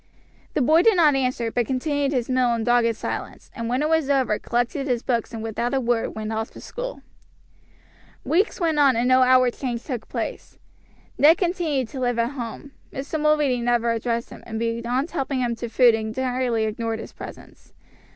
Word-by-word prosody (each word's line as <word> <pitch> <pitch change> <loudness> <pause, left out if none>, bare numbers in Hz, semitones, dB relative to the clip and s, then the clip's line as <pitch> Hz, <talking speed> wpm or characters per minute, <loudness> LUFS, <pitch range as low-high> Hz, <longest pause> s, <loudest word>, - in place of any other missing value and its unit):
The 285 - +2
boy 315 +6 +5
did 445 +2 +4
not 315 -4 +5
answer, 255 -3 -1
but 240 -2 0
continued 285 +1 0
his 250 -4 -1
meal 255 -2 +2
in 230 - -2
dogged 235 -1 +3
silence, - - -6
and 230 -2 -4
when 255 +4 0
it - - +2
was 320 -3 +1
over 260 -6 +2
collected 245 +4 -1
his 245 -2 0
books 235 -2 -1
and 225 -2 -6
without 235 +3 -2
a - - +2
word 240 -2 -1
went 220 0 -4
off 220 +1 -2
to - - -11
school. - - -7 1.2
Weeks 385 +8 +1
went 325 -4 +1
on, 275 -3 +5
and 235 +2 +1
no 255 0 +5
outward 255 -1 +5
change 245 -3 -4
took 250 -6 -5
place. - - -5 0.6
Ned 315 +4 +7
continued 335 - 0
to 270 - -7
live 245 -2 0
at 235 +2 +1
home. 260 +1 -7 0.2
Mr. 280 +4 -4
Mulready 300 -5 +2
never 235 -1 +1
addressed 230 +1 -2
him, - - -10
and 220 - -4
beyond 235 +6 -1
helping 275 -4 -2
him 240 -1 0
to 235 0 -5
food 240 0 +5
entirely 235 +1 -1
ignored 225 +1 -2
his 225 - -9
presence. - - -12
250 Hz, 190 wpm, -23 LUFS, 235-280 Hz, 1.2 s, Ned